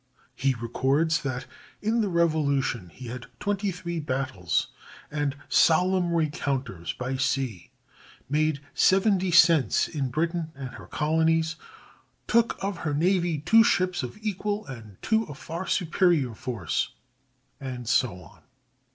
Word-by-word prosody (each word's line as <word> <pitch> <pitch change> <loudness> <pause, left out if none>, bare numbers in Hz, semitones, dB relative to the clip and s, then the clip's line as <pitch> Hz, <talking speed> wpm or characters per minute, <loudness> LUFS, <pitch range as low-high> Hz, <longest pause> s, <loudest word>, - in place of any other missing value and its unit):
He 135 -1 0
records 135 +7 +1
that 130 -2 -3 0.3
"in 225 +2 +1
the 205 - 0
Revolution 140 - +1
he 125 - -11
had 125 +1 -7
twenty 205 -1 -1
three 170 -2 -4
battles 130 - -1 0.4
and 145 -2 -1
solemn 180 +2 +3
rencounters 135 - -2
by 130 +1 -3
sea; 130 -8 -1 0.6
made 150 +1 +1
seven 195 +1 +4
descents 170 -5 +4
in 140 -5 -2
Britain 165 +4 -1
and 135 -1 -6
her 105 -7 -11
colonies; 160 +3 +1 0.7
took 235 0 +2
of 195 -2 -2
her 150 -3 -2
navy 175 0 +2
two 225 +8 +6
ships 185 -6 +1
of 125 +5 -6
equal 210 0 -2
and 110 -7 -10
two 220 0 +1
of 145 - -9
far 170 +4 -6
superior 165 - +2
force," 110 -8 -3 0.6
and 125 -3 -6
so 120 -4 +2
on. - - -18
155 Hz, 130 wpm, -26 LUFS, 130-180 Hz, 0.7 s, two